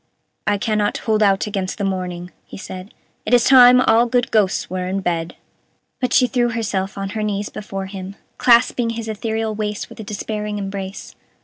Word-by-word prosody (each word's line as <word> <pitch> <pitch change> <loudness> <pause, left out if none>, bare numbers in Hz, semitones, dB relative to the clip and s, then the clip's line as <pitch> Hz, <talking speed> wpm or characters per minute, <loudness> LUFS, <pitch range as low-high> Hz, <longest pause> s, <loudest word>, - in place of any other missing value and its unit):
"I 205 -1 +2
cannot 210 0 0
hold 220 -1 0
out 195 -1 +3
against 195 -3 -3
the 205 - -3
morning," 180 -2 -3 0.2
he - - -10
said; 185 +1 -8 0.3
"it 240 - +3
is 240 - +4
time 250 -1 +8
all 235 0 +4
good 245 0 0
ghosts 205 -4 +1
were 185 0 -3
in 195 +1 -2
bed." 170 -2 -2 0.6
But 255 -1 -1
she 255 - +5
threw 245 -1 +1
herself 200 -4 -2
on 195 0 -3
her 215 +2 -4
knees 205 -1 -2
before 195 -2 -6
him, 190 0 -8 0.2
clasping 240 0 +4
his 230 -1 -4
ethereal 220 0 -2
waist 210 -1 -4
with - - -13
a - - -5
despairing 210 0 -4
embrace. 195 -1 -6
210 Hz, 185 wpm, -20 LUFS, 195-225 Hz, 0.6 s, time